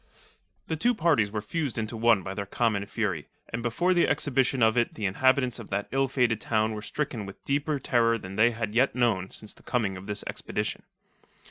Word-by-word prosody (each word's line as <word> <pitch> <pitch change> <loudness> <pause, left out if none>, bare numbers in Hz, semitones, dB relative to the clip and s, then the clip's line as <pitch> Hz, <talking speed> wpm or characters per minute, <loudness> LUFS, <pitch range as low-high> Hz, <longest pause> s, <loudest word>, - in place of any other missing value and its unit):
The 160 - -2
two 240 +10 +2
parties 155 - +3
were 105 0 -4
fused 145 +2 -2
into 110 +1 -2
one 115 -3 +3
by 95 - -4
their 100 0 -4
common 100 -2 0
fury, 95 -10 -2 0.2
and 115 - -3
before 150 +11 +1
the 175 - +3
exhibition 135 -3 +1
of 110 0 +4
it 120 -1 +1
the 105 - -3
inhabitants 130 +5 +2
of 115 - -9
that 100 +1 -2
ill 135 0 +2
fated 125 -4 +1
town 110 -1 +1
were 105 - -5
stricken 115 -3 -3
with 95 - -12
deeper 145 +2 0
terror 115 -3 +2
than 95 -2 -8
they 110 +3 +5
had 110 -2 -4
yet 125 +4 +3
known 110 -7 +1
since 105 - -11
the - - -20
coming 105 -7 -1
of 95 +2 -10
this 105 0 -3
expedition. - - -4
115 Hz, 210 wpm, -27 LUFS, 105-130 Hz, 0.2 s, they